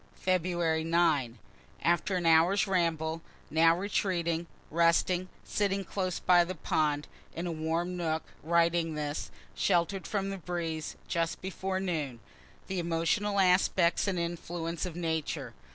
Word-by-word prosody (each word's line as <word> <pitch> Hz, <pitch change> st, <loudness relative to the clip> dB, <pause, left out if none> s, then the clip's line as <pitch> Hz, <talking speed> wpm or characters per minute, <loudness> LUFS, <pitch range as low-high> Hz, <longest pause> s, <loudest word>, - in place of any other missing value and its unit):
Feb. 175 Hz, -3 st, +1 dB
9. 160 Hz, -8 st, +2 dB, 0.5 s
After 175 Hz, +3 st, +2 dB
an 175 Hz, -2 st, -1 dB
hour's 165 Hz, +5 st, +5 dB
ramble, 165 Hz, -4 st, 0 dB, 0.3 s
now 165 Hz, +2 st, +5 dB
retreating, 175 Hz, -4 st, -1 dB, 0.2 s
resting, 170 Hz, +2 st, +2 dB
sitting 200 Hz, -1 st, 0 dB
close 185 Hz, -1 st, -2 dB
by 175 Hz, -1 st, +5 dB
the 185 Hz, +2 st, -5 dB
pond, 150 Hz, -2 st, 0 dB, 0.3 s
in 170 Hz, -, -3 dB
a 175 Hz, -, -2 dB
warm 165 Hz, +3 st, -1 dB
nook, 160 Hz, -2 st, -1 dB, 0.2 s
writing 170 Hz, 0 st, +2 dB
this, 150 Hz, 0 st, -3 dB, 0.2 s
shelter'd 185 Hz, +1 st, +1 dB
from 195 Hz, -2 st, -1 dB
the 195 Hz, -, -5 dB
breeze, 165 Hz, -2 st, -4 dB
just 165 Hz, 0 st, -1 dB
before 190 Hz, 0 st, -3 dB
noon. 155 Hz, -10 st, -2 dB, 0.5 s
The 190 Hz, -1 st, -3 dB
emotional 170 Hz, +5 st, 0 dB
aspects 180 Hz, -1 st, +3 dB
and 190 Hz, -2 st, 0 dB
influences 170 Hz, 0 st, -3 dB
of 170 Hz, -, -8 dB
Nature! 160 Hz, -3 st, -2 dB
170 Hz, 130 wpm, -30 LUFS, 160-185 Hz, 0.5 s, hour's